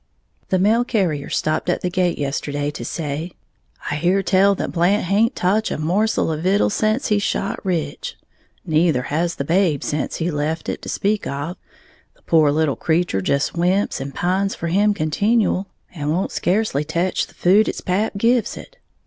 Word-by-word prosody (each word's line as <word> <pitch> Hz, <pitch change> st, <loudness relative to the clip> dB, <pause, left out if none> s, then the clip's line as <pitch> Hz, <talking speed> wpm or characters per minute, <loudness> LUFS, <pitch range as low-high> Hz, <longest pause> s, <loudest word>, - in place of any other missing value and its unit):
_ -, -, -42 dB
The 185 Hz, -, +2 dB
mail 215 Hz, +6 st, +3 dB
carrier 180 Hz, -, -1 dB
stopped 155 Hz, +3 st, -1 dB
at 175 Hz, -, 0 dB
the 180 Hz, -, -1 dB
gate 180 Hz, -1 st, +1 dB
yesterday 145 Hz, +1 st, -2 dB
to 135 Hz, -, -7 dB
say, 155 Hz, +5 st, -4 dB, 0.6 s
"I -, -, 0 dB
hear 180 Hz, +5 st, +2 dB
tell 195 Hz, +1 st, +4 dB
that -, -, -3 dB
Blant 180 Hz, +4 st, +2 dB
haint 215 Hz, +7 st, +2 dB
toch 205 Hz, +5 st, +1 dB
a -, -, -3 dB
morsel 180 Hz, +5 st, +1 dB
of 155 Hz, 0 st, -3 dB
vittles 195 Hz, +3 st, +2 dB
sence 215 Hz, +5 st, 0 dB
he 210 Hz, -1 st, +3 dB
shot 200 Hz, 0 st, -2 dB
Rich. 190 Hz, -, -3 dB, 0.5 s
Neither 160 Hz, -5 st, +2 dB
has 165 Hz, +5 st, -1 dB
the -, -, -3 dB
babe, 165 Hz, -2 st, +1 dB
sence 150 Hz, -1 st, -2 dB
he 170 Hz, +2 st, -1 dB
left 155 Hz, +2 st, -2 dB
it, -, -, -4 dB
to -, -, -7 dB
speak 205 Hz, +1 st, 0 dB
of, 145 Hz, +6 st, -4 dB, 0.6 s
the -, -, -30 dB
pore 155 Hz, -3 st, +4 dB
little 155 Hz, -2 st, +1 dB
creetur 160 Hz, -, 0 dB
just 140 Hz, +9 st, 0 dB
whimps 180 Hz, 0 st, 0 dB
and 135 Hz, +1 st, -6 dB
pines 190 Hz, +3 st, 0 dB
for 170 Hz, -, -4 dB
him 205 Hz, +4 st, +3 dB
continual, 200 Hz, +4 st, +1 dB, 0.3 s
and 150 Hz, -4 st, -3 dB
won't 175 Hz, +5 st, 0 dB
scacely 180 Hz, -6 st, 0 dB
tech 170 Hz, +4 st, -1 dB
the -, -, -2 dB
food 200 Hz, +5 st, +4 dB
its -, -, -5 dB
pap 195 Hz, +4 st, 0 dB
gives 235 Hz, +2 st, +1 dB
it. -, -, -12 dB
175 Hz, 185 wpm, -21 LUFS, 155-200 Hz, 0.6 s, tell